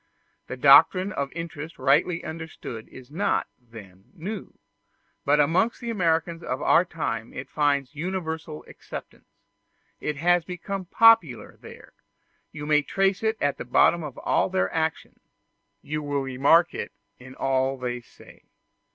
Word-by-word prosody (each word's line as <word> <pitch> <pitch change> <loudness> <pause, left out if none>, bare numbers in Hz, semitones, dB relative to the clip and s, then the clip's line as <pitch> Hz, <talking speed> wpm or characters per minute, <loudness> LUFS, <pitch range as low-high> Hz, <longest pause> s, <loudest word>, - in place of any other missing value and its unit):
The 125 - -6
doctrine 185 +8 +6
of 140 -6 -3
interest 165 -1 -7
rightly 150 +6 +2
understood 160 -8 -8
is 130 +1 -14
not, 195 +7 0
then, 105 -6 -14
new, 195 +4 -7 0.7
but 145 +1 +3
amongst 175 +10 +2
the 235 -1 -4
Americans 165 -4 0
of 130 -5 -3
our 170 - +4
time 145 -10 -4
it 130 - -7
finds 140 -3 0
universal 160 -2 -5
acceptance: - - -10 0.7
it 150 -1 -3
has 175 +3 +3
become 185 +2 -5
popular 205 - +4
there; - - -13 0.6
you 150 -1 -7
may 150 0 +3
trace 195 +5 0
it 220 0 0
at 145 0 -1
the - - -4
bottom 165 +7 +3
of 145 -4 -8
all - - +1
their 190 0 -1
actions, 160 -1 -3 0.6
you 155 +1 -3
will 145 -1 -2
remark 140 +6 +3
it - - -5 0.3
in 130 +1 -12
all 135 0 0
they 125 -1 -4
say. - - -19
155 Hz, 145 wpm, -25 LUFS, 135-175 Hz, 0.7 s, doctrine